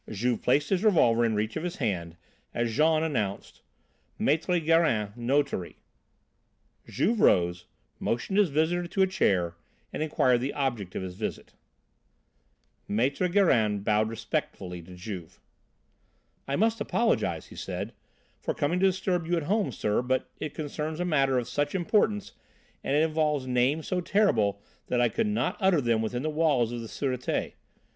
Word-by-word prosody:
Juve 115 +3 -1
placed 145 +7 +2
his 190 +1 +1
revolver 120 - +4
in 115 -2 +1
reach 105 +1 -1
of - - -2
his 175 +1 -4
hand 85 - -3 0.4
as 120 -2 -1
Jean 155 +2 +3
announced: 110 -11 -3 0.6
"Maître 165 +4 +2
Gérin, 150 -11 +2
notary." 125 -5 -1 1.1
Juve 225 +1 0
rose, 85 - +3 0.3
motioned 190 - -1
his 200 -5 +4
visitor 160 +4 +1
to 190 +2 +1
a - - +6
chair 95 - +1 0.4
and - - -3
inquired 130 -5 +2
the 135 +3 -3
object 120 -10 -2
of - - -3
his 90 -1 -5
visit. 105 +4 -5 1.4
Maître 140 - +1
Gérin 110 - +3
bowed 110 +1 +2
respectfully 95 -5 -4
to 90 +2 -12
Juve. 90 -3 -8 1.1
"I 140 - -1
must 225 +4 +1
apologise," 235 -1 0
he - - -12
said, - - -5 0.5
"for - - -2
coming 160 +5 0
to 195 - +5
disturb 185 -3 -1
you 175 0 +1
at 165 - -1
home, 205 +6 0
sir, 105 +2 0
but 130 +1 -1
it 155 - -5
concerns 155 +1 -4
a 180 - 0
matter 135 -6 +2
of 120 - -1
such 145 +4 -1
importance 205 +2 +1 0.5
and 140 - 0
it 150 - +4
involves 155 -3 0
names 130 +5 +1
so 180 -1 0
terrible 110 - +2 0.2
that 125 - 0
I 120 -1 +4
could 225 - 0
not 210 0 -1
utter 190 -5 +3
them 115 -4 +1
within 120 +3 -2
the 155 - -1
walls 150 -7 +2
of 120 -1 -4
the 115 - -7
Sûreté. 125 0 -2
140 Hz, 160 wpm, -28 LUFS, 110-170 Hz, 1.4 s, a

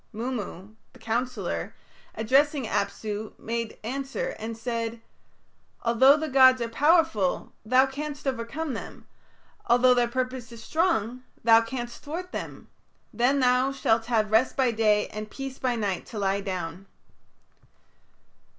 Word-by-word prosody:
Mummu, 215 -4 -5 0.2
the 255 - -17
counsellor, 240 +3 -3 0.4
addressing 275 +5 +2
Apsu, 210 0 -3
made 230 0 -4
answer, 275 - -3
and 225 0 -5
said, 230 -1 -3 0.8
"Although 260 +5 +6
the 315 +1 -3
gods 260 -2 +6
are 235 - -1
powerful, 295 - +2
thou 255 +4 +4
canst 290 +2 -6
overcome 270 +4 -3
them; - - -8 0.6
although 245 +1 +5
their 245 -1 +2
purpose 255 -1 -3
is 230 -1 -10
strong, 255 - 0 0.2
thou 225 0 +7
canst 240 0 -6
thwart 350 +5 -6
it. - - -6 0.5
Then 255 +4 +2
thou 250 +1 +3
shalt 225 -4 +1
have 220 -3 +1
rest 225 +4 +3
by 260 -3 +3
day 215 -2 +2
and 215 0 -7
peace 270 +1 -7
by 255 -2 0
night 205 -5 -2
to 225 - -8
lie 200 0 0
down." 185 -1 -5
240 Hz, 130 wpm, -26 LUFS, 220-265 Hz, 0.8 s, thou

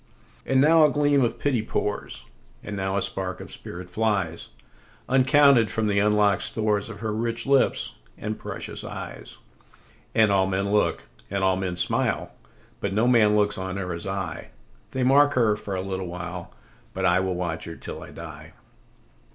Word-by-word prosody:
And 135 - +3
now 160 +3 +6
a 150 - +6
gleam 145 -1 +2
of 120 - -1
pity 135 -6 0
pours, 105 -1 -3 0.4
And 105 - -5
now 95 0 -1
a 100 - +2
spark 95 -1 -3
of - - -8
spirit 90 +1 -7
flies, 95 -4 -1 0.6
Uncounted, 135 -3 +5
from 110 +3 -1
the 100 -1 +2
unlock'd 105 -2 +3
storesOf 105 -1 0
her 110 -1 -2
rich 115 +1 0
lips 140 - +2 0.2
and 110 +1 -4
precious - - -5
eyes. - - -8 0.8
And 110 -2 +5
all 95 -1 +3
men 100 +1 -1
look, 105 0 +1 0.3
and 100 0 -2
all 95 -1 +3
men 95 -2 -3
smile, - - -1 0.5
But 100 - -2
no 115 +3 +3
man 110 -4 +5
looks 105 -1 +2
on 95 0 -4
her 90 -2 -3
as 85 +3 -6
I:They 95 +7 -6
mark 145 +3 +5
her 115 -4 +3
for 100 -1 -5
a 95 - -2
little 95 -1 -4
while, 90 0 -6 0.4
But 95 0 -1
I 90 0 +4
will 95 -1 -1
watch 85 -2 -3
her 85 - -7
till - - -8
I - - -10
die. - - -10
105 Hz, 170 wpm, -25 LUFS, 95-115 Hz, 0.8 s, now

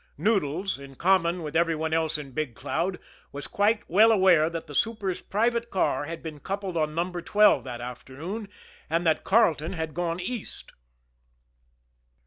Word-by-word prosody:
Noodles, 190 -4 0
in 140 -1 -11
common 175 0 +2
with 150 0 -6
every 165 0 +3
one 160 +1 -2
else 160 -1 +1
in 145 -3 -8
Big 130 -3 -3
Cloud, 170 +8 -2 0.3
was 145 0 -6
quite 210 +2 +1
well 215 +6 +6
aware 185 -6 +5
that 165 -1 -5
the 145 - -10
super's 200 0 -1
private 235 +3 0
car 145 -7 0
had 165 +2 -7
been 155 -2 -7
coupled 195 +1 -4
on 155 -1 0
No. 175 +2 -1
12 180 - +3
that 120 -2 -6
afternoon, 135 - -7 0.4
and 165 +2 0
that 160 -1 +2
Carleton 170 -7 +3
had 160 -3 -4
gone 170 0 -2
East. 225 +4 -5
170 Hz, 160 wpm, -26 LUFS, 155-195 Hz, 0.4 s, well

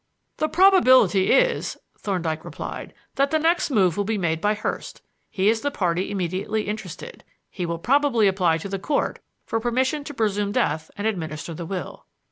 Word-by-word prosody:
"The 310 - 0
probability 290 - +5
is," - - +2 0.2
Thorndyke 165 -6 -2
replied, - - -7 0.2
"that 275 +1 +3
the 315 - +2
next 330 +2 +2
move 190 - +3
will 205 - +1
be 215 +2 -1
made 165 -4 -1
by 210 +2 +2
Hurst. 215 - -5 0.3
He 195 0 0
is 225 +1 +3
the 285 - 0
party 180 -8 -1
immediately 195 +3 -2
interested. 220 - -7 0.3
He 180 -3 -4
will 170 0 -2
probably 255 - +2
apply 180 -4 +2
to 165 - -6
the 195 0 -3
Court 285 +9 -1 0.3
for 225 - -1
permission 260 +5 0
to 290 - -6
presume 205 -3 0
death 160 -10 0
and 205 - -4
administer 165 -6 -3
the 165 +1 -6
will." 185 -1 -6
205 Hz, 175 wpm, -23 LUFS, 180-260 Hz, 0.3 s, probability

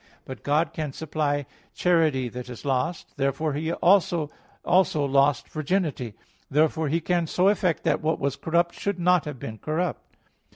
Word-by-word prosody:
But 130 - -8
God 155 +3 +1
can 150 -3 -4
supply 145 -2 -1 0.3
charity 160 -7 +2
that 125 +2 -7
is 125 +1 -9
lost; 140 +5 -2
therefore 140 +2 0 0.3
also 175 -5 +3 0.7
lost 140 -1 +2
virginity. 155 - -2 0.3
Therefore 155 +2 +2
He 160 +4 +1
can 170 0 0
so 180 +4 +3
effect 185 -5 +1
that - - +1
what 160 0 +1
was 140 -1 -1
corrupt 170 +3 +1
should 200 -2 -3
not 180 -1 +3
have 150 -3 -5
been 110 -2 -7
corrupt. 160 +2 -3
155 Hz, 150 wpm, -25 LUFS, 140-170 Hz, 0.7 s, also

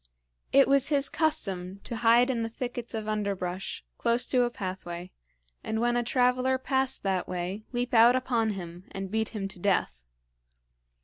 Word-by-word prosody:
It 275 - +6
was 275 -1 +5
his 285 -2 +4
custom 195 - +1
to 235 - -5
hide 240 +3 +4
in 235 -3 -2
the 225 - -2
thickets 245 -1 -5
of 215 -1 -4
underbrush, 195 -3 -3
close 235 +1 +2
to 255 - +3
a 240 - +2
pathway, 185 -4 -6 0.5
and, 220 - -2
when 240 +1 +1
a 240 - +2
traveler 255 +1 +2
passed 265 0 -1
that 190 -2 -1
way, 185 +4 -4
leap 245 0 -3
out 235 +2 +6
upon 235 -4 0
him 175 -1 -8
and 195 -1 -5
beat 220 0 -1
him 205 -4 -4
to 190 - -10
death. 175 - 0
225 Hz, 170 wpm, -28 LUFS, 195-250 Hz, 0.5 s, It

